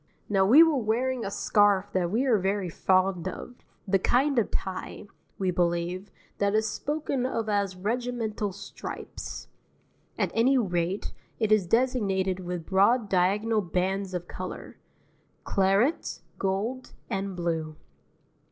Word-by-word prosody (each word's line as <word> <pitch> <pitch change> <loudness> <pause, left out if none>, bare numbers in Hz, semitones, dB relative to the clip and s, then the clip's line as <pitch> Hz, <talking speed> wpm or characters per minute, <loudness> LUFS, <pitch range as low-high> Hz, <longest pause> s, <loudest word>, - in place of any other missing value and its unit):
Now 195 -2 +3
we 285 +10 +9
were 320 -4 +2
wearing 245 +2 0
a - - -2
scarf 205 -1 +2
that 180 -2 +1
we 230 +8 +1
are 235 -6 +3
very 190 0 -1
fond 185 +1 +1
of, 185 +6 -6 0.3
the 195 0 +3
kind 260 +6 +2
of 220 - 0
tie, 190 +1 -4 0.3
we 190 -2 0
believe, 175 +2 -1 0.3
that 200 +1 +2
is 220 0 +2
spoken 285 +2 -2
of 230 -3 -2
as 200 -3 0
"regimental 220 0 -2
stripes"; 195 - -8 0.7
at - - 0
any 255 +4 +4
rate, 180 -3 -1 0.2
it 220 -2 0
is 210 -4 +4
designated 195 -5 +1
with 175 -2 -5
broad 205 +4 +3
diagonal 205 +4 +2
bands 190 +1 -1
of 175 0 -4
colour: 185 0 -7 0.6
claret, 195 - +1 0.2
gold, 210 +7 -2
and 195 0 -3
blue. 165 -3 -2
200 Hz, 135 wpm, -27 LUFS, 185-230 Hz, 0.7 s, we